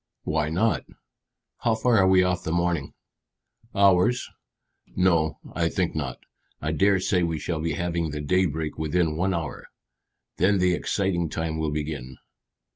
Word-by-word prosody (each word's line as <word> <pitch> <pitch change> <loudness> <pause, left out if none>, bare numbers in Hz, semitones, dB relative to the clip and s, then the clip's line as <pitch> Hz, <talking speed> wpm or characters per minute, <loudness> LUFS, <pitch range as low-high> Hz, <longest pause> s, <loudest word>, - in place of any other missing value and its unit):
"Why 80 -1 0
not? 100 +8 +1 0.8
How 115 -1 +1
far 115 0 +3
are 95 - +5
we 95 0 +5
off 90 -1 0
the 80 - -3
morning?" 85 -3 -1 0.8
"Hours." 100 +4 +4 0.7
"No; 85 -4 +2 0.2
I 85 0 +1
think 90 -1 -1
not. 70 -5 -3 0.4
I 80 - -2
dare 95 +5 +3
say 90 0 +1
we 85 -2 0
shall 80 +1 -3
be 80 -1 -1
having 85 0 -1
the 75 0 -4
day 90 +6 +2
break 80 0 -4
within 80 0 +1
one 95 +3 0
hour, 80 -4 -5 0.7
then 100 +3 +3
the 90 -1 +3
exciting 85 -2 0
time 80 0 -3
will 80 -1 0
begin." 75 -4 -4
85 Hz, 155 wpm, -25 LUFS, 80-95 Hz, 0.8 s, are